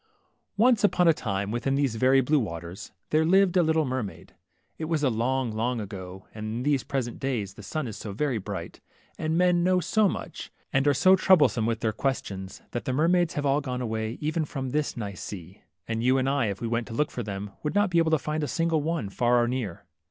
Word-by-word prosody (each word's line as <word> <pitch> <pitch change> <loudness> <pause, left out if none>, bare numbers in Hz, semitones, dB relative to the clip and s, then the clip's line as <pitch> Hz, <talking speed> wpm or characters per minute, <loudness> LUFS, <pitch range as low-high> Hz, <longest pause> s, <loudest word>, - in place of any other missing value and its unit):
Once 230 0 +4
upon 180 -4 +4
a 165 - +7
time, 100 -6 -3
within 125 +4 0
these 140 -4 +1
very 130 +4 +4
blue 145 +4 +2
waters, 85 -4 -6 0.2
there 155 +1 +4
lived 190 +2 +4
a 180 - +6
little 160 -1 +2
mermaid. 130 -6 -5 0.5
It 160 - -2
was 155 -2 -1
long, 125 0 +1
long 115 +3 -1
ago, 95 -2 -7
and 110 - -7
in 110 +3 -3
these 140 -2 +1
present 125 -4 -3
days 115 -8 -2
the 105 - -12
sun 155 +7 -3
is 110 -1 -6
so 105 - -6
very 125 +2 -1
bright, 95 -4 -7 0.4
and 160 +1 0
men 180 -1 +3
know 185 0 +3
so 205 +4 +2
much, - - -6 0.2
and 135 +2 +2
are 145 - +5
so 185 +7 +6
troublesome 155 -12 +4
with 115 0 -1
THE 110 - +1
MERMAID. 110 - -5
their 135 - +3
questions^ 95 -7 -7
that 120 - -4
the 130 - -1
mermaids 170 +4 +2
have 145 - -1
all 140 +1 +2
gone 125 -3 -4
away 110 -1 -3
even 155 +2 -1
from 135 -3 -4
this 150 -1 -1
nice 100 -5 -5
sea 95 -1 -8
\ 90 0 -49
and 115 0 -2
you 130 +2 +3
and 130 0 +1
1, 135 -4 +1
if 100 0 -4
we 115 - -2
went 115 +1 -1
to 115 - -7
look 150 +4 0
for 125 - -4
them, 100 -1 -5
would 150 +4 -3
not 205 -2 +3
be 170 - +4
able 165 -1 +3
to 160 - +4
find 155 +2 -3
a - - -1
single 165 -1 +1
one, 160 -6 -2
far 120 +4 +2
or - - 0
near. 120 -8 -4
130 Hz, 240 wpm, -27 LUFS, 110-155 Hz, 0.5 s, a